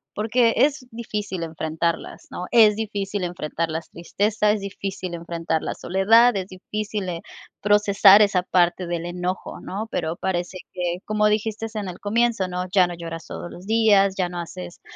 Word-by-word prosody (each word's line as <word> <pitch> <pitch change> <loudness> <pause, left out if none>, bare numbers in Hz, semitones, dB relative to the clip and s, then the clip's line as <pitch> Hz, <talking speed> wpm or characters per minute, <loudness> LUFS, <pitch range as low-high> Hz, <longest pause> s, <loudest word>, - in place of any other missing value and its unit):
porque 230 +2 +2
es 275 +2 +2
difícil 210 -5 -4
enfrentarlas, 160 +1 -3
¿no? 180 - -5
Es 220 -3 +6
difícil 205 -2 -3
enfrentar 165 -1 -3
las 160 +1 -5
tristeza, 210 +4 0
es 210 -1 -1
difícil 195 -2 -5
enfrentar 165 -1 -2
la - - -2
soledad, 225 +6 +4
es 185 -1 -3
difícil, 205 +1 -4
eh, 170 -1 -4 0.4
procesar 205 0 +6
esa 195 -3 +2
parte 180 0 +2
del 170 -1 -3
enojo, 180 +1 -4
¿no?, 210 +4 -5
pero 160 -1 -2
parece 180 0 -3 0.2
que 175 -1 -2
como 210 0 +2
dijiste 220 +1 -1
en 210 -2 -3
el 180 -1 -7
comienzo, 225 -2 +1
¿no?, 180 0 -3
ya 190 -2 +5
no 175 - -5
lloras 165 -1 -7
todos 175 - -7
los 180 - -11
días, 210 -3 +4
ya 185 -2 +1
no 175 0 -5
haces 90 - -8
190 Hz, 170 wpm, -23 LUFS, 175-210 Hz, 0.4 s, Es